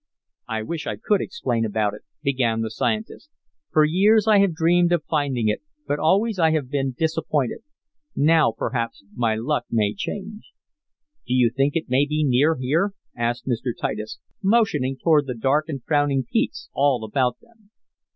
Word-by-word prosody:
"I 110 -2 -3
wish 160 +7 -5
I 110 - -2
could 200 - +1
explain 120 - -2
about 105 -1 0
it," 105 - -10 0.2
began 125 -5 +1
the 110 -1 -3
scientist. 220 - -3 0.4
"For 155 -1 +5
years 205 +7 +3
I 210 -2 +6
have 195 -4 +2
dreamed 175 +2 +3
of 170 -3 +1
finding 140 -8 -1
it, 105 - 0 0.2
but 145 - -1
always 200 +5 +2
I 160 -1 +4
have 140 -5 -2
been 135 -3 -1
disappointed. 155 -5 -1 0.6
Now, 155 -3 +4
perhaps, 115 0 -3
my 115 -2 0
luck 135 +7 -1
may 105 -3 +1
change." 210 - -7 0.7
"Do 125 - 0
you 120 -2 +4
think 140 +1 +1
it 165 - -1
may 135 +3 +2
be 155 0 0
near 140 +6 +3
here?" 160 +10 0 0.2
asked 120 +1 -2
Mr. 120 -1 -2
Titus, 110 0 -4 0.2
motioning 190 - +2
toward 150 -2 +3
the 125 - -3
dark 145 +7 +1
and 135 -5 -5
frowning 145 -3 +1
peaks - - -2
all 135 -4 +2
about 125 +2 0
them. 225 -3 -26
145 Hz, 170 wpm, -23 LUFS, 120-165 Hz, 0.7 s, I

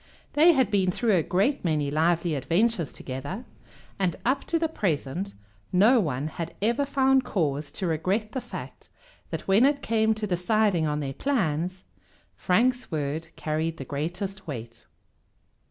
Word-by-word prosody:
They 325 +4 +6
had 260 -8 +2
been 190 -3 +3
through 215 +3 +2
a 175 - +4
great 200 - +1
many 150 -4 0
lively 165 +2 +2
adventures 175 - +1
together, 140 - -6 0.5
and 185 -3 +1
up 265 +3 +1
to 335 - +1
the 325 0 +1
present 180 - -2 0.4
no 220 +7 +5
one 145 - -1
had 165 +1 -5
ever 235 +7 +1
found 270 -1 +3
cause 150 - -1
to 190 - -3
regret 185 +7 0
the 260 - -3
fact - - -9 0.4
that - - -5
when 195 +5 +5
it 280 +1 +3
came 220 -1 +2
to 215 0 -3
deciding 185 -2 +1
on 150 0 -1
their 135 -1 -3
plans 185 - -1 0.5
Frank's 245 +6 +1
word 155 +1 -2
carried 160 +1 -2
the 135 - -6
greatest 180 +8 -4
weight. 115 -5 -7
185 Hz, 155 wpm, -26 LUFS, 155-225 Hz, 0.5 s, They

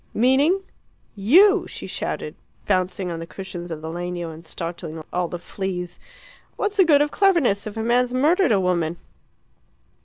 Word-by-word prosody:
"Meaning 280 - +3 0.3
?" - - -39 0.2
"You!" 405 +2 +6
she - - -8
shouted, - - -4 0.3
bouncing 185 -1 0
on 165 - -4
the 165 - -7
cushions 180 -2 -7
of 160 -2 -6
the 160 - -6
legno 175 0 -4
and 160 +1 -13
startling 165 -2 -6
all 180 0 0
the 175 - -5
fleas. 180 0 -5 0.6
"What's 415 0 -2
the 380 - +6
good 295 -3 +5
of 295 - -3
cleverness 310 - +2
if 215 +1 -7
a 220 - -2
man's 245 +2 +2
murdered 305 +6 +3
a 205 - +4
woman?" 175 -3 0
190 Hz, 165 wpm, -23 LUFS, 175-280 Hz, 0.6 s, You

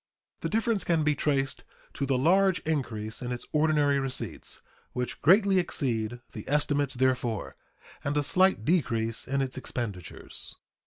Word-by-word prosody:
The - - -2
difference 225 -1 +1
can 165 -3 +2
be 150 0 +3
traced 135 -2 0 0.3
to 140 - -2
the 135 -1 +2
large 185 +7 +4
increase 115 -8 -3
in 125 0 -3
its 125 - -4
ordinary 150 -2 +3
receipts 130 - -4 0.3
(which 125 0 -3
greatly 195 +3 +5
exceed 120 -8 -1
the 105 - -8
estimates 145 -2 +1
therefor) 125 -4 0 0.5
and 140 +1 -1
a 145 - +2
slight 185 - +3
decrease 115 -9 0
in 135 +1 +1
its 130 0 -4
expenditures." 105 -10 -5
140 Hz, 145 wpm, -28 LUFS, 120-155 Hz, 0.5 s, greatly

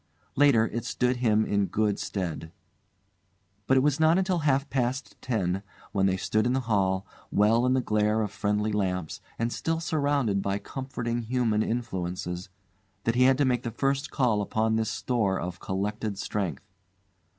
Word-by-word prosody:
Later, 135 -6 +5
it 120 - -3
stood 125 0 0
him 110 -3 +2
in 100 -1 +1
good 105 -2 0
stead. 85 -4 -4 1.2
But 135 - +4
it - - +5
was 145 +1 +2
not 160 +2 +5
until 185 -2 +1
half 140 -2 +1
past 130 +1 -1
ten, 95 -6 -1 0.3
when 95 -1 +2
they 95 0 +1
stood 110 +4 +1
in 125 - +1
the 130 - +1
hall, 100 -4 +1 0.2
well 115 +4 +3
in 130 - +3
the 130 - +2
glare 105 -1 +1
of 105 - -3
friendly 105 +1 0
lamps 90 -5 -2 0.2
and 115 +1 -1
still 165 0 -1
surrounded 140 -10 +1
by 100 0 -1
comforting 120 -1 -4
human 115 -2 +1
influences, 90 -6 -3 0.5
that 115 - +1
he 125 +1 +4
had 130 0 +5
to 145 - +3
make 125 -2 +1
the 120 - -3
first 135 +5 -1
call 120 -6 +1
upon 110 +2 0
this 110 0 0
store 105 -6 0
of 90 0 -5
collected 105 +2 -3
strength. 95 -7 -3
110 Hz, 170 wpm, -27 LUFS, 100-130 Hz, 1.2 s, Later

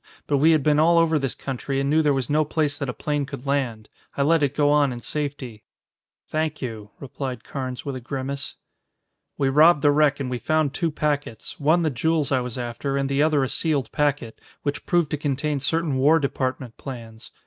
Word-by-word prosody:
But 145 - +1
we 155 +4 +5
had 155 -3 +4
been 150 0 +3
all 170 +2 +5
over 165 -2 +3
this 135 -3 -2
country 135 +1 -3
and 135 - 0
knew 155 +3 +3
there 150 -2 +3
was 135 -3 -1
no 155 +1 +2
place 150 -1 0
that 140 - -3
a - - 0
plane 145 +3 -2
could 140 -2 -8
land. 130 -6 -1 0.3
I 140 - +2
let 165 +2 +3
it 145 -1 0
go 145 -1 +3
on 145 -2 +3
in 120 - -5
safety." 135 -5 -4 0.6
"Thank 155 -1 -2
you," 110 -5 -6
replied 130 -3 -6
Carnes 130 -2 -5
with 140 -2 -3
a 130 - -6
grimace. 135 +2 -5 0.8
"We 135 - +1
robbed 150 +2 +5
the 145 - +6
wreck 145 -1 +3
and 135 - -2
we 125 -1 -3
found 155 -1 +1
two 165 +2 0
packets, 145 -7 -3
one 160 +4 +3
the 155 - +1
jewels 150 +3 0
I 130 - +3
was 125 -1 -5
after, 125 +3 -3
and 135 0 -1
the 140 +1 +1
other 150 -2 +3
a - - 0
sealed 145 -8 0
packet, 145 -6 -1 0.2
which 145 0 -3
proved 170 -4 +2
to 150 - 0
contain 145 0 -1
certain 155 +1 0
War 145 +5 +5
Department 130 -4 -3
plans. 115 0 -9
140 Hz, 215 wpm, -24 LUFS, 130-150 Hz, 0.8 s, the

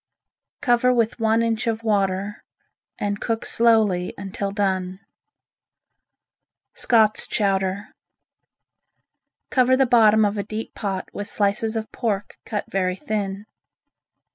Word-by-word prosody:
Cover 250 -2 +3
with 235 -1 0
one 225 +1 +2
inch 230 0 -1
of 225 0 -1
water 200 -1 -1 0.5
and 205 0 -3
cook 225 -1 -2
slowly 220 -6 +2
until 200 0 -4
done. 190 -2 -1 1.7
Scott's 220 -3 +3
Chowder 195 0 -1 1.6
Cover 260 0 +4
the 270 - +4
bottom 220 -3 +5
of 205 0 -1
a - - -1
deep 220 +2 -6
pot 195 -3 -4
with 205 - -5
slices 215 +2 0
of 220 -1 -4
pork 210 -5 -3
cut 210 -2 -3
very 185 -1 0
thin. 200 0 -4
210 Hz, 115 wpm, -23 LUFS, 195-225 Hz, 1.7 s, bottom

